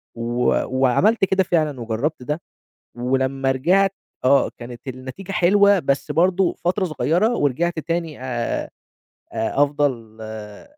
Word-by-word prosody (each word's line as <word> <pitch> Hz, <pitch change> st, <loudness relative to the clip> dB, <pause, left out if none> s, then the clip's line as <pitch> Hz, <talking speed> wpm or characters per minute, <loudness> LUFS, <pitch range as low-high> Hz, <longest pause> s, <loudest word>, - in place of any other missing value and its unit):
و 120 Hz, +1 st, 0 dB, 0.2 s
وعملت 190 Hz, -, +3 dB
كده 190 Hz, 0 st, +2 dB
فعلًا، 155 Hz, -7 st, 0 dB
وجرّبت 120 Hz, +6 st, -2 dB
ده، 150 Hz, +5 st, -3 dB, 0.5 s
ولمّا 130 Hz, +2 st, 0 dB
رجعت 185 Hz, +9 st, +2 dB, 0.3 s
آه 135 Hz, +2 st, +4 dB
كانت 120 Hz, +2 st, -9 dB
النتيجة 130 Hz, +10 st, -7 dB
حلوة، 200 Hz, +2 st, +4 dB
بس 140 Hz, -4 st, -1 dB
برضو 180 Hz, +2 st, +2 dB
فترة 185 Hz, +3 st, +1 dB
صغيرة، 180 Hz, -, +1 dB
ورجعت 160 Hz, +5 st, 0 dB
تاني، 165 Hz, -2 st, -3 dB
آآ، 120 Hz, -3 st, -3 dB, 0.6 s
آآ، 110 Hz, +6 st, +1 dB
أفضل، 135 Hz, -7 st, -1 dB
آآ، 110 Hz, -1 st, -8 dB
145 Hz, 120 wpm, -21 LUFS, 125-175 Hz, 0.6 s, آه